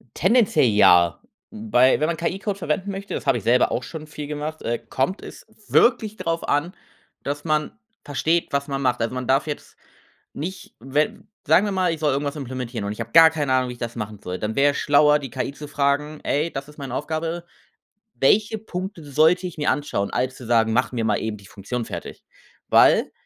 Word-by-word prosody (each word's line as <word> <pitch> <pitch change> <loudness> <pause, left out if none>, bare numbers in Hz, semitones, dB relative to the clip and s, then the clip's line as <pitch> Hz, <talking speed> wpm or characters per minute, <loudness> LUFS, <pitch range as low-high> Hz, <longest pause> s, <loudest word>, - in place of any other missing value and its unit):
Tendenziell 195 - +3
ja. 90 -6 +5 0.4
Wobei, 120 +4 +3
wenn 155 - +1
man 170 0 -1
KI-Code 195 +4 -3
verwenden 185 +3 -2
möchte 195 +1 -7
das - - -5
habe 120 - +3
ich 105 - -10
selber 125 +2 +3
auch 125 - -1
schon 155 +4 -8
viel 150 -1 -7
gemacht, 150 +1 -5
äh, 120 0 -1
kommt 135 +10 -2
es - - -11 0.2
wirklich 225 -3 +3
drauf 165 -3 -3
an, 150 +5 0 0.5
dass 145 +1 -4
man 155 -2 0 0.3
versteht, 160 +4 0
was 140 0 -1
man 135 -1 -2
macht. 125 -2 +1
Also, 115 +2 -2
man 125 -1 -4
darf 135 +4 +2
jetzt 145 - -7 0.6
nicht, 180 +6 -7
wenn 135 +5 -2 0.2
sagen 165 +6 +5
wir 205 - -1
mal, 185 -2 +1
ich 160 - -7
soll 150 -2 +2
irgendwas 140 +2 -2
implementieren 125 -4 -5
und 100 - -3
ich 105 - -14
habe 115 0 -7
gar 165 0 +8
keine 145 -4 -1
Ahnung, 130 -1 +1
wie - - -5
ich 120 - -15
das 120 -1 -5
machen 105 -2 -6
soll. 90 0 -5
Dann 110 +1 -3
wär 145 +1 +4
es 140 - -5
schlauer, 150 +1 +4
die 135 -2 -7
KI 125 - -3
zu 150 +1 -9
fragen: 145 +1 0
„Ey, 155 +4 0
das 135 +1 -6
ist 150 - -16
meine 135 -4 -6
Aufgabe. 165 +3 -3 0.7
Welche 210 +10 +2
Punkte 190 -4 -6
sollte 160 +6 +3
ich 175 - -10
mir 150 - +1
anschauen?‟ 145 -9 -2
als 125 +1 -1
zu 125 - -11
sagen: 115 -1 +3
„Mach 125 +3 +1
mir 115 -2 -1
mal 105 -2 +2
eben 110 -1 -4
die 100 - -16
Funktion 115 +5 -5
fertig.‟ - - -8 0.5
Weil, - - +5
145 Hz, 210 wpm, -23 LUFS, 125-165 Hz, 0.7 s, gar